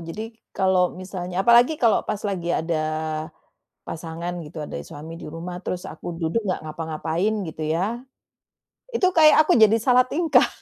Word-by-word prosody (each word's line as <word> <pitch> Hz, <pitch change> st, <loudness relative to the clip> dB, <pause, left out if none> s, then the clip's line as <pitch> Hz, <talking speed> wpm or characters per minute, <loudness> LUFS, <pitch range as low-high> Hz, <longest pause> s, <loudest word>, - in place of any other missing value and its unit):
Jadi 215 Hz, +8 st, -7 dB, 0.2 s
kalau 185 Hz, -2 st, +2 dB
misalnya 185 Hz, 0 st, -4 dB
apalagi 240 Hz, +6 st, +6 dB
kalau 230 Hz, -6 st, +3 dB
pas 205 Hz, -, -2 dB
lagi 190 Hz, -4 st, -2 dB
ada, 165 Hz, -1 st, 0 dB, 1.0 s
pasangan 170 Hz, +1 st, -5 dB
gitu, 155 Hz, 0 st, -7 dB
ada 145 Hz, -, -6 dB
suami 160 Hz, +3 st, -9 dB
di -, -, -9 dB
rumah 170 Hz, +3 st, -6 dB
terus 180 Hz, -, -3 dB
aku 165 Hz, +2 st, -7 dB
duduk 165 Hz, +7 st, -1 dB
nggak 185 Hz, -, -1 dB
ngapa-ngapain 160 Hz, +5 st, -2 dB
gitu 155 Hz, 0 st, -6 dB
ya, 195 Hz, +8 st, -1 dB, 1.0 s
itu 465 Hz, -, +1 dB
kayak 310 Hz, -4 st, +7 dB
aku 355 Hz, -, +4 dB
jadi 220 Hz, +1 st, +7 dB
salah 250 Hz, +2 st, +4 dB
tingkah. 330 Hz, +3 st, +3 dB
180 Hz, 155 wpm, -23 LUFS, 165-220 Hz, 1.0 s, kayak